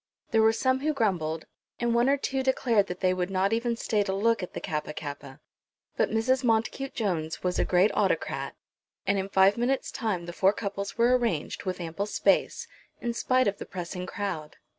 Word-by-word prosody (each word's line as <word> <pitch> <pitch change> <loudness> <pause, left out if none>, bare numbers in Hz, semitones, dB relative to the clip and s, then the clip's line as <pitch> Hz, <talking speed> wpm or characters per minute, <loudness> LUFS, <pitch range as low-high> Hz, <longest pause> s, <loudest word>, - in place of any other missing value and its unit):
There 225 -2 +4
were 220 0 +6
some 260 +3 +1
who 305 +3 0
grumbled, 170 -9 0 0.3
and 240 -1 +1
one 240 +2 +3
or 280 - +4
two 270 -1 -1
declared 240 -6 +2
that 180 - -6
they 185 -1 +3
would 180 0 -2
not 195 +2 +1
even 235 +1 0
stay 215 -2 0
to 195 -1 -1
look 225 +2 +2
at 180 - -6
the - - -2
Kappa 150 -3 -3
kappa. 145 -2 -7 0.6
But - - +2
Mrs. 255 +4 +1
Montacute 240 +3 0
Jones 165 -8 -2
was 180 -1 0
a - - +3
great 185 +4 +4
autocrat; - - 0 0.5
and 200 0 +2
in 190 +1 -3
five 195 +2 +4
minutes' 260 +3 0
time 205 -8 -2
the 175 - -7
four 190 +3 +3
couples 200 0 -4
were 240 +2 +5
arranged, 230 -12 -1
with 185 -1 -2
ample 175 +4 -3
space, - - +1 0.3
in 235 -1 -2
spite 255 +1 +2
of 200 - -1
the - - -6
pressing 180 0 -5
crowd. 180 -8 -4
200 Hz, 200 wpm, -28 LUFS, 180-235 Hz, 0.6 s, were